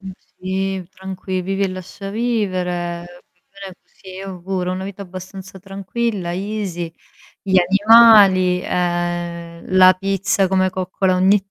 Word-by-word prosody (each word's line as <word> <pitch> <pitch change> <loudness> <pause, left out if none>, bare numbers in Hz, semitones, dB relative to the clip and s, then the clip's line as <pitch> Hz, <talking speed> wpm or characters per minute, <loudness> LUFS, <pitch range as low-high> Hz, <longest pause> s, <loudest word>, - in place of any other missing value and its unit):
Ma 190 -1 -8
sì, 190 0 -4
tranqui 190 -1 -5
vivi 195 +2 -2
e 195 - +1
lascia 185 +2 -8
vivere. 180 -7 -2 0.8
sì, 190 - -19
io 195 0 -7
ho 180 - -12
pure 185 -1 -2
ho - - -1
una 185 +1 -4
vita 200 +1 -7
abbastanza 185 +1 -10
tranquilla, 195 0 -4
easy, 185 -3 -4 0.5
gli 190 -1 0
animali 195 -2 +6
ehm, 175 -1 -3
la 185 0 +8
pizza 195 +1 0
come 185 0 +1
coccola 185 0 -1
ogni 195 +2 +2
190 Hz, 130 wpm, -19 LUFS, 180-195 Hz, 0.8 s, la